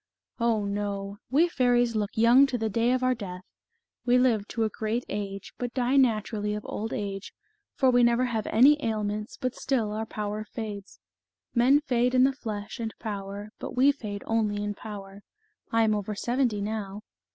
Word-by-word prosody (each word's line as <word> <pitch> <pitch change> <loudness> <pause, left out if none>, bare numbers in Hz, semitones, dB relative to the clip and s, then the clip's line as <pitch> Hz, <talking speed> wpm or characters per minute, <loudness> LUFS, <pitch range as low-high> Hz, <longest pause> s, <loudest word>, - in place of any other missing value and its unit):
" - - -66
Oh, 230 -3 +1
no! 200 0 -3
we 300 +7 +4
fairies 245 -6 +2
look 210 -2 0
young 240 +5 +6
to 260 -2 -2
the 220 -2 -2
day 230 +4 +2
of 255 0 +1
our 255 0 +3
death; 185 -6 -7 0.6
we 245 0 +4
live 230 -5 +2
to 230 - -1
a 220 - +1
great 220 +3 -2
age, 200 -1 -5
but 245 0 -4
die 255 +1 +1
naturally 215 -5 +2
of 210 - -6
old 220 +2 -4
age, 200 -1 -4 0.4
for 260 -2 +4
we 245 0 +4
never 235 +1 +4
have 225 -3 -2
any 285 +6 +5
ailments, 210 -1 -2
but 255 -2 -2
still 235 -6 -1
our 220 +1 -3
power 210 0 -4
fades. 210 -2 -7 0.5
Men 265 +4 +5
fade 250 -2 +1
in 255 - +6
the 270 +1 +4
flesh 215 -3 -6
and 225 -1 -4
power, 205 0 -5
but - - -6
we 265 +3 +5
fade 210 -7 -6
only 210 -2 0
in 205 0 -2
power. 200 -2 -9 0.5
I 225 0 +3
am 215 -1 +3
over 210 0 -2
seventy 240 -1 0
now." 210 -1 -4
220 Hz, 185 wpm, -27 LUFS, 205-245 Hz, 0.6 s, young